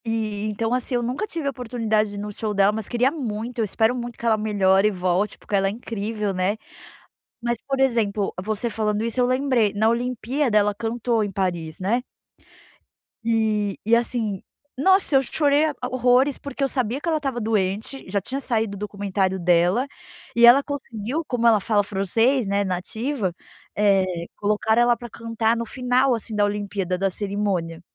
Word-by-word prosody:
E 215 -2 -2
então, 225 +3 -1
assim, 250 0 -1
eu 240 - 0
nunca 255 - -2
tive 325 -7 -4
oportunidade 225 -5 -1
no 210 +1 -5
show 210 0 -3
dela 200 +1 +4
mas 215 -1 -5
queria 250 +2 +2
muito, 240 -4 -4
eu 225 - +2
espero 220 +4 +1
muito 240 -1 -6
que - - -8
ela 225 -1 +4
melhore 200 -2 +3
e - - +1
volte 185 +2 0
porque 205 - -4
ela 195 0 +3
é - - +1
incrível, 215 -2 -3
né, 185 +3 0 0.9
mas 235 0 0
por 270 -1 -1
exemplo 220 -6 +1
você 215 +3 -2
falando 215 -1 -1
isso 230 +2 -3
eu 250 - +4
lembrei 255 -5 +2
na 215 +2 +2
olimpíada 245 +1 +1
ela 205 0 +2
cantou 230 +1 -1
em 205 - -3
Paris, 175 -4 -2
né. 230 +7 0 1.2
E, 220 -3 +1
e 225 +2 +5
assim, 230 -4 -1 0.3
nossa 375 +2 +3
eu 270 - +6
chorei 290 +3 +2 0.2
horrores 255 +2 +2
porque 280 0 -4
eu - - +3
sabia 255 -1 -1
que 320 - -7
ela 320 -1 +2
estava 270 -5 -3
doente, 215 +3 -1
já 200 +1 +1
tinha 265 +8 -5
saído 225 -5 0
do 200 - -6
documentário 200 -2 -1
dela, 175 +7 +3 0.5
e 235 - +3
ela 250 +4 +8
conseguiu 275 0 -4
como 245 -2 -1
ela 220 -2 +6
fala 205 +1 +2
francês, 220 +5 +1
né, 200 +1 +1
nativa, 200 +4 -2 0.5
eh, 200 -2 +4 0.3
colocar 210 +2 +1
ela 240 0 +4
para 240 - -8
cantar 230 0 -1
no 235 0 -3
final 255 +1 +2
assim 225 -1 -6
da 205 0 +3
olimpíada 200 -3 -2
da 195 +1 +1
cerimônia. 195 -5 -2
220 Hz, 175 wpm, -23 LUFS, 205-245 Hz, 1.2 s, ela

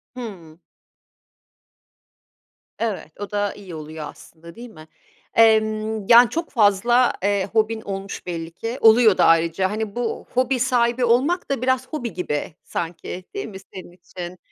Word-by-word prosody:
Hımm. 180 -9 -9 2.2
Evet, 215 -8 -3
o 205 -1 -6
da 205 -1 -1
iyi 190 -4 -10
oluyor 155 0 -7
aslında, 170 +3 -14
değil 240 +1 -10
mi? 155 -6 -14 0.5
Emm, 215 -1 +3
yani, 240 0 +8
çok 330 +7 -3
fazla, 235 +2 +3
eee, 200 -1 +1
hobin 220 0 +1
olmuş 195 -1 -6
belli 165 -2 -5
ki, 225 +8 -5
oluyor 225 -2 +6
da - - +4
ayrıca, 165 +3 +3
hani, 215 -1 -4
bu 240 -2 -3
hobi 255 +1 0
sahibi 245 -1 +2
olmak 275 +11 +1
da 275 - -1
biraz 260 0 0
hobi 245 - -5
gibi 160 -2 -3
sanki, 175 +2 -5
değil 405 0 -4
mi, 195 - -9 0.2
senin 185 -2 -9
için? 175 0 -9
215 Hz, 145 wpm, -22 LUFS, 180-240 Hz, 2.2 s, yani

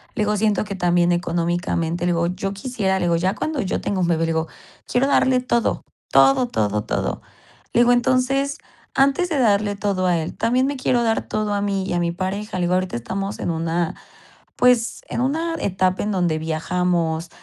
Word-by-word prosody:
le 215 - +1
digo: 210 0 +1
"Siento 210 0 +1
que 205 - -5
también 175 -1 +2
económicamente", 175 0 -1
le 175 - +2
digo: 170 0 +1
"Yo 190 +3 -3
quisiera", 200 -3 -1
le - - 0
digo: 170 -1 +2
"Ya 185 +4 0
cuando 300 +4 -2
yo 190 - -2
tenga 195 -2 -2
un 175 - +1
bebé", 165 -1 +1
le 165 0 +1
digo: 160 0 -1 0.4
"Quiero 250 +2 +3
darle 260 -2 +3
todo, 235 -2 0 0.3
todo, 265 -2 +5
todo, 105 - -1
todo". - - -2 0.5
Le 235 - +4
digo: 245 0 +5
"Entonces, 260 +3 +1 0.4
antes 280 +7 +3
de 305 - 0
darle 205 -4 +2
todo 200 -2 -1
a 175 -2 +2
él, 160 0 -4
también 250 +3 +1
me 285 +1 -1
quiero 250 -2 +1
dar 225 -1 +1
todo 215 -1 -1
a 200 - 0
mí 200 -1 -1
y - - -3
a 175 - +1
mi 170 0 0
pareja", 190 +3 -4
le 180 - 0
digo: 175 +1 +1
"Ahorita 185 -4 0
estamos 195 - -4
en - - -1
una, 165 +1 -1 0.6
pues, 245 -2 +3
en - - -2
una 320 +6 0
etapa 185 -1 0
en 210 - -1
donde 175 -4 0
viajamos, 165 +1 -1
195 Hz, 205 wpm, -21 LUFS, 175-240 Hz, 0.6 s, todo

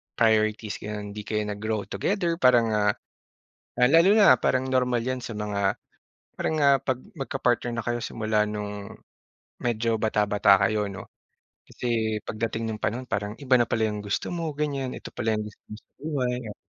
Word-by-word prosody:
priorities, 110 -1 +2
gano'n. 105 -1 -6
Hindi 105 - -6
kayo 105 0 0
nag-grow 105 +1 -2
together 175 -4 -1
parang, 120 -3 +5
ah 105 -1 +3 0.9
ah, 125 0 +5
lalo 165 +4 +6
na 195 -11 +8
parang 130 0 +1
normal 125 -2 +2
'yan 130 0 -2
sa 115 - -6
mga 100 -2 -1 0.6
parang, 160 - 0
ah, 140 -1 +6
'pag 130 -2 -1 0.2
magka-partner 125 -3 0
na 115 - -2
kayo 120 0 -1
simula 110 -2 0
no'ng 105 0 -5 0.7
medyo 115 -1 +1
bata-bata 105 -2 +3
kayo, 105 0 +1
'no? 100 - -9 0.6
Kasi 110 -3 -1
pagdating 115 +1 -3
nung 110 - -6
panahon, 120 +4 -2
parang 105 -2 -3
iba 130 -1 +4
na 120 - +2
pala 110 -1 +1
'yong 105 - -4
gusto 100 - -2
mo, 165 -3 -2
ganyan. 140 -4 -2
Ito - - -9
pala 110 -1 -1
'yong 105 - -2
gusto 105 - -15
mo 105 - -8
sa - - -42
buhay, 135 -5 -1
ya 105 - -7
115 Hz, 175 wpm, -26 LUFS, 105-130 Hz, 0.9 s, na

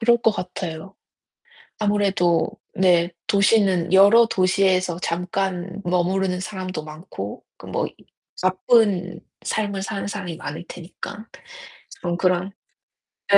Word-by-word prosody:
그럴 235 +1 +4
것 225 -2 +3
같아요. 180 -1 -6 0.8
아무래도 195 -6 +2 0.2
네. 175 -2 +3 0.2
도시는 195 -4 +3
여러 200 +5 +7
도시에서 185 -3 +2
잠깐 180 +2 -2
머무르는 180 +1 +1
사람도 185 -4 -5
많고 155 - -8
그 - - -13
뭐 - - -1 0.6
바쁜 185 -1 +2 0.2
삶을 200 -3 -2
사는 200 0 -4
사람이 175 -4 -5
많을 160 +2 -6
테니까 190 +5 -8 0.8
좀 175 -1 -1
그런 185 +1 +1 0.8
예 - - +11
185 Hz, 230 characters per minute, -23 LUFS, 175-200 Hz, 0.8 s, 예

